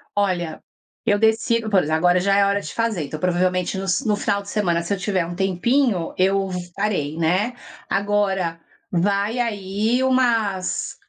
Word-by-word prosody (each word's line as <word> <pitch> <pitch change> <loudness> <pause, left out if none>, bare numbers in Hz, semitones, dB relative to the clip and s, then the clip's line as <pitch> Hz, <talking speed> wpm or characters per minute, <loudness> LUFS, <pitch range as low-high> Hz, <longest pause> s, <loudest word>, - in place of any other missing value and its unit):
Olha, 180 -5 -1 0.4
eu 205 -2 +3
decido, 225 +1 +2
por 195 -3 +4
exemplo, 155 +1 0
agora 180 +2 +3
já 195 +2 +2
é 200 - +5
hora 200 0 +1
de - - -8
fazer, 225 -9 -1
então 155 - -6
provavelmente 180 +2 0
no 195 0 -4
sa 230 +8 0
no 210 -1 +2
final 200 0 -1
de 200 - -11
semana 175 -6 0
se 200 - -2
eu - - -1
tiver 185 -1 -1
um 175 +1 -6
tempinho, 190 +1 +1
eu 195 +1 +2 0.3
farei, 175 -7 -1
né, 185 +9 +1 0.4
agora, 195 -4 0 0.3
vai 200 +6 0
aí 215 +2 0
umas 230 -7 +1
195 Hz, 170 wpm, -22 LUFS, 180-215 Hz, 0.4 s, é